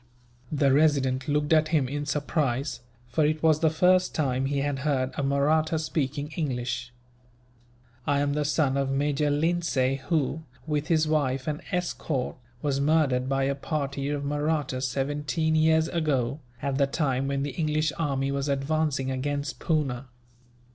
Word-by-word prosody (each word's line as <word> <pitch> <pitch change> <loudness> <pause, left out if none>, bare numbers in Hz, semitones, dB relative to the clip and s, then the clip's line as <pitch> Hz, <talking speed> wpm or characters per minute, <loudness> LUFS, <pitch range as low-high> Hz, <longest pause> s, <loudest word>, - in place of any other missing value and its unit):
The 140 -3 +3
Resident 135 -3 +2
looked 150 +1 +1
at 155 0 +4
him 155 -5 +2
in 145 +2 -4
surprise, 140 -2 -1 0.3
for 130 +6 +1
it 155 +1 0
was 155 -1 +4
the 160 - +3
first 180 +3 +3
time 135 -3 0
he 140 0 0
had 140 -1 -1
heard 135 -3 0
a - - -3
Mahratta 150 +4 +2
speaking 145 -2 -2
English. 125 -5 -2 1.2
"I 145 -1 +2
am 145 0 +1
the 150 0 0
son 145 -2 +1
of 135 -1 0
Major 145 +2 +1
Lindsay 145 -4 +1
who, 160 -2 0 0.2
with 150 -1 -1
his 160 -2 +2
wife 135 -4 0
and 150 -1 -2
escort, 165 -6 -2 0.3
was 140 -2 0
murdered 140 -4 +2
by 135 0 +1
a 140 +1 +1
party 140 -1 -3
of 145 -1 -2
Mahrattas, 145 -3 -1
seventeen 145 +5 -1
years 160 0 +4
ago, 145 -6 0 0.2
at 140 -1 -1
the 140 - +4
time 135 -2 0
when 140 0 -1
the 145 - -2
English 155 +1 0
army 140 -3 0
was 140 +1 -1
advancing 140 -1 0
against 140 +2 -3
Poona. 135 -6 -1
145 Hz, 155 wpm, -27 LUFS, 135-155 Hz, 1.2 s, at